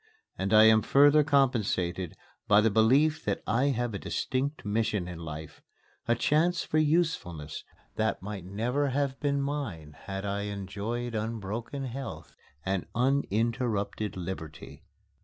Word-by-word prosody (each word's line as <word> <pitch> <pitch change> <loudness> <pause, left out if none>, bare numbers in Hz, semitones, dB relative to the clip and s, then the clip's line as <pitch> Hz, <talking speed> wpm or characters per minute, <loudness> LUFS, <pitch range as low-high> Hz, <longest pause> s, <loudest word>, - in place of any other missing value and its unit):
And 95 +1 -2
I 110 0 +8
am 110 0 +7
further 145 +4 +5
compensated 110 - +1 0.3
by 105 0 +6
the 110 +1 +3
belief 135 +9 +4
that 100 - -1
I 120 +5 +2
have 120 -4 0
a 100 - -3
distinct 135 0 -2
mission 105 -3 0
in 90 -2 -7
life 80 -2 -8 0.5
a 120 - +3
chance 165 +8 +2
for 155 - +1
usefulness 150 - 0 0.3
that 110 -1 0
might 100 -1 -6
never 120 +10 -1
have 135 0 -1
been 140 -1 0
mine 125 - -4
had 95 0 -4
I 100 0 -2
enjoyed 105 +5 -4
unbroken 110 +4 -4
health 115 - -7 0.3
and 95 -1 -1
uninterrupted 115 -5 0
liberty. 85 -4 -7
110 Hz, 135 wpm, -29 LUFS, 95-135 Hz, 0.5 s, I